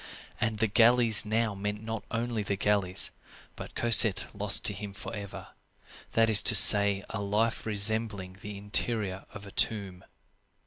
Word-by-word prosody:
And 110 -1 -4
the 110 - -2
galleys 115 0 +2
now 110 0 -3
meant 105 +2 -8
not 110 -2 -8
only 115 -1 -6
the 100 0 -5
galleys, 100 -2 -1 0.4
but - - -13
Cosette 115 -3 +2
lost 105 0 +3
to 105 - +6
him 100 +1 -11
forever; 100 -1 -11 0.6
that 115 0 0
is 110 -2 +6
to 115 - +4
say, 100 -1 +5
a 115 - -7
life 110 +3 -4
resembling 105 -2 -1
the 105 -1 -11
interior 105 -1 -2
of 100 -1 -13
a 100 - -14
tomb. 95 -5 -1
105 Hz, 150 wpm, -25 LUFS, 100-115 Hz, 0.6 s, to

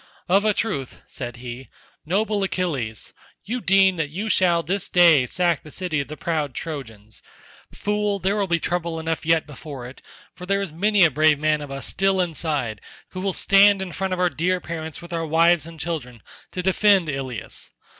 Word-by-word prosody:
"Of 195 +4 +3
a 215 - +3
truth," 145 - -3
said 120 0 -6
he, 120 0 -8 0.4
"noble 210 +3 0
Achilles, 150 - -3 0.3
you 245 +3 -3
deem 195 -2 +4
that 155 -3 -1
you 200 +8 -4
shall 175 -4 +3
this 190 +4 -2
day 165 -8 +6
sack 175 +1 +1
the 155 - -13
city 170 -2 -2
of 140 - -3
the 155 - -8
proud 155 -6 -2
Trojans. 115 -9 -7 0.5
Fool, 210 0 -1
there 195 +2 0
will 205 -2 0
be 170 -1 +1
trouble 170 -2 -2
enough 160 -1 -3
yet 165 -1 +3
before 140 -3 -9
it, 125 +2 -11 0.3
for 180 - -10
there 195 +1 +2
is 195 -6 -4
many 205 +3 +3
a 160 - +5
brave 155 +2 +4
man 155 0 +1
of 145 - -7
us 135 -1 -5
still 195 0 +1
inside 150 - -2 0.3
who 185 - -6
will 195 0 0
stand 200 +1 +5
in 190 -2 -5
front 190 +2 -3
of 185 - -2
our 180 -1 +2
dear 180 +3 0
parents 160 -1 -6
with 170 0 -9
our 165 -1 -1
wives 165 +1 +3
and 165 -1 -11
children, 135 - -5 0.3
to 180 - -4
defend 190 -1 +4
Ilius. 135 -6 -5
170 Hz, 195 wpm, -23 LUFS, 145-190 Hz, 0.5 s, day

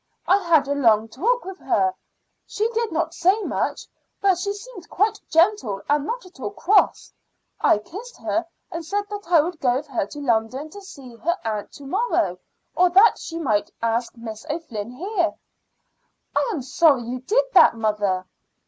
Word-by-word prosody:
I 390 - +4
had 330 -7 +3
a 285 - +1
long 225 -5 +3
talk 460 - 0
with 380 0 -8
her. 375 -1 +1 0.5
She 430 +2 0
did 465 -2 -1
not 325 0 -1
say 370 +5 +3
much, - - -2 0.3
but 385 -3 +3
she 400 +2 -1
seemed 405 -3 -10
quite 415 +4 +1
gentle 330 - +2
and 295 0 +1
not 480 -2 -4
at 365 -6 -17
all 210 - -3
cross. 390 - +2 0.5
I - - +4
kissed 410 - -10
her 335 - -2 0.2
and 335 0 -5
said 405 +6 -1
that 405 -4 -7
I 335 -3 +7
would 335 +1 -4
go 245 -2 +2
with 280 +3 -2
her 240 -6 -1
to 295 - -9
London 255 +3 -1
to 405 - -10
see 275 -11 -12
her 340 - -1
aunt 215 -2 -3
to 285 - -12
morrow, 395 - 0 0.4
or 360 0 +4
that 390 +6 +6
she 330 - -6
might 215 -11 0
ask 230 +2 -1
Miss 220 -2 -8
O'Flynn 270 -10 -4
here." 345 - -1 1.0
"I - - +2
am 310 - -3
sorry 275 -1 +3
you 245 +2 -4
did 445 - +2
that, - - +7
mother." 210 -4 0
320 Hz, 180 wpm, -23 LUFS, 240-385 Hz, 1.0 s, I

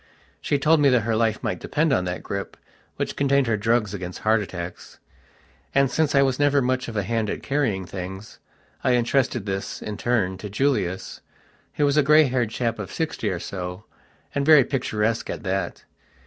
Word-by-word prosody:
She 145 - +1
told 155 +3 +4
me 145 -1 +5
that 125 -2 +4
her 115 0 0
life 110 -1 0
might - - -2
depend 155 -1 0
on 90 - +1
that 90 0 -4
grip, 100 0 -5 0.4
which - - -3
contained 140 -1 +2
her 115 -2 +1
drugs 110 -1 +1
against 90 -2 -5
heart 110 0 +3
attacks. 90 -3 -7 0.8
And, 140 -1 +3
since 155 -3 +1
I 140 - +6
was 135 -1 0
never 145 0 +4
much 130 0 0
of 110 -2 -5
a 100 - +1
hand 110 0 -1
at - - -4
carrying 125 -10 0
things, 95 +3 -8 0.4
I 125 - +3
entrusted 120 -2 +1
this, 95 -1 -4
in 105 -1 -6
turn, 100 -6 0
to 105 - -6
Julius, 100 -6 -1 0.5
who 145 - +2
was 140 +1 +2
a - - +7
grey 150 +2 +6
haired 125 -5 0
chap 115 0 -2
of 100 -2 -6
sixty 155 -9 -2
or 90 -3 -2
so, 90 +1 -6 0.5
and 140 - 0
very 150 -2 +7
picturesque 115 -4 -1
at - - -5
that. 95 0 -3
115 Hz, 190 wpm, -24 LUFS, 100-140 Hz, 0.8 s, a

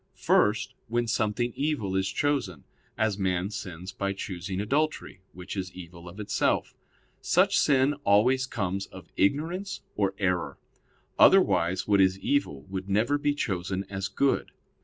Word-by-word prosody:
First, 105 +1 +2
when 120 +1 0
something 115 +1 0
evil 140 -10 -1
is 95 0 +1
chosen; 120 - -1 0.3
as 110 -2 0
man 95 0 0
sins 90 -2 -7
by 100 +1 -2
choosing 95 -1 -5
adultery, 140 -2 -1
which 90 +3 -8
is 95 -1 -4
evil 85 -1 -10
of 90 +5 -12
itself. 105 -1 0 0.5
Such - - +3
sin 135 0 +3
always 125 +6 +3
comes 100 -5 -3
of - - -13
ignorance 165 - 0
or 100 -2 0
error; 90 -3 -1 0.6
otherwise 85 +2 +4
what 100 -2 +4
is 95 0 +3
evil 95 - -1
would 95 +3 -6
never 115 +9 +2
be 145 0 +1
chosen 95 -6 -2
as 95 -1 -2
good. 135 +8 0
100 Hz, 140 wpm, -27 LUFS, 95-120 Hz, 0.6 s, otherwise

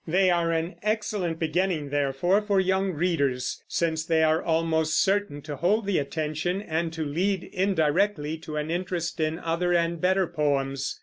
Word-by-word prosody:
They 185 +3 +3
are 170 -1 +1
an 165 +2 -2
excellent 210 -5 -1
beginning, 165 -2 -1
therefore, 145 +8 +2
for 205 -2 +1
young 190 +1 +1
readers, 145 -6 -1
since 160 -2 0
they 160 0 +2
are 160 0 +3
almost 160 -1 +1
certain 195 -7 0
to 145 -1 -6
hold 205 +7 +1
the 195 -4 +1
attention, 155 +5 -2
and 165 -4 -2
to 160 -1 -3
lead 185 +6 0
indirectly 175 -3 0
to 155 -1 -7
an 150 +1 -2
interest 175 -1 -3
in 155 0 0
other 170 +1 0
and 170 -1 0
better 190 +1 +3
poems. 140 -4 -1
165 Hz, 165 wpm, -26 LUFS, 155-185 Hz, -, They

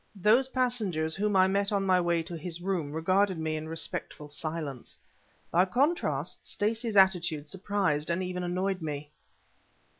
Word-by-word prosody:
Those 225 +7 +4
passengers 215 -12 0
whom 205 0 0
I 185 0 +6
met 200 +1 0
on 200 -1 +1
my 185 -1 +4
way 170 -1 +1
to 170 - -7
his 165 +1 -6
room 175 -5 -2
regarded 185 +4 +2
me 160 -1 -2
in 155 0 -5
respectful 155 -2 -4
silence. 150 -4 -4 0.5
By 180 +2 +4
contrast, 185 - 0
Stacey's 225 +1 -1
attitude 175 -6 +3
surprised 185 -4 -1
and 170 +2 0
even 180 0 -3
annoyed 185 +1 -1
me. 150 -1 -5
180 Hz, 150 wpm, -29 LUFS, 160-200 Hz, 0.5 s, I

